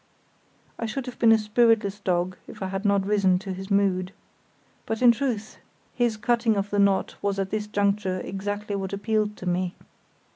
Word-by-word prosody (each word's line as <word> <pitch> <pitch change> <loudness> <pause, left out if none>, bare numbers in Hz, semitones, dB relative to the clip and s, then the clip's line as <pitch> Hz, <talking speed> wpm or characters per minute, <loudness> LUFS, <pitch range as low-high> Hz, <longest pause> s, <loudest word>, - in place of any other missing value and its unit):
I 230 - -2
should 255 +4 -4
have 250 - -8
been 230 -1 +6
a 225 - +7
spiritless 215 -2 +2
dog 180 -1 0
if - - -8
I 190 - -3
had 195 +2 -4
not 200 -1 +2
risen 200 -3 +3
to 190 0 -5
his 190 +1 -7
mood. 195 -2 +1 0.7
But 225 +2 -2
in 245 - +9
truth 235 -4 -3 0.3
his 240 -3 0
cutting 235 -1 +2
of 200 +1 -2
the 205 - +1
knot 200 -1 +2
was 200 -1 -1
at 195 -1 -2
this 215 -1 -2
juncture 200 -2 0
exactly 205 +2 -4
what 195 -1 -4
appealed 210 +1 -1
to - - -8
me. 180 0 -1
205 Hz, 185 wpm, -25 LUFS, 195-220 Hz, 0.7 s, in